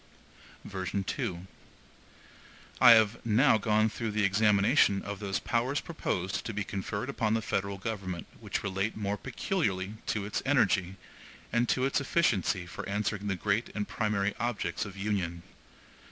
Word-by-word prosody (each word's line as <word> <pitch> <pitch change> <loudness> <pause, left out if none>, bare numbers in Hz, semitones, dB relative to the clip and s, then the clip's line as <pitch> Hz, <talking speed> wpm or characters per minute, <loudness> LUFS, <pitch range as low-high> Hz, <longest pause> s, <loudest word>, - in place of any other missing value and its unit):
(E1) 95 -2 -3 1.4
(I 125 - +10
have 110 0 +3
now 115 +1 +4
gone 110 +1 +3
through 110 +1 -3
the 105 0 0
examination 100 +2 +4
of 100 -1 -5
those 100 -2 -1
powers 130 +5 0
proposed 95 - -3
to 110 - -5
be 105 - -1
conferred 100 +4 -4
upon 110 -5 0
the 115 - 0
federal 100 -1 -2
government 95 -5 -4
which - - -3
relate 100 +2 -2
more 100 -1 -1
peculiarly 100 - -2
to 105 -2 -1
its 105 - -2
energy, 100 -9 +2 0.6
and 120 +1 +2
to 130 - +2
its 135 +1 +1
efficiency 105 - +1
for 85 - -7
answering 105 0 -1
the 95 - 0
great 105 +5 0
and 105 -1 -2
primary 105 -2 0
objects 120 -2 -2
of 100 -1 -9
union. 95 -4 -2
105 Hz, 145 wpm, -30 LUFS, 95-115 Hz, 1.4 s, I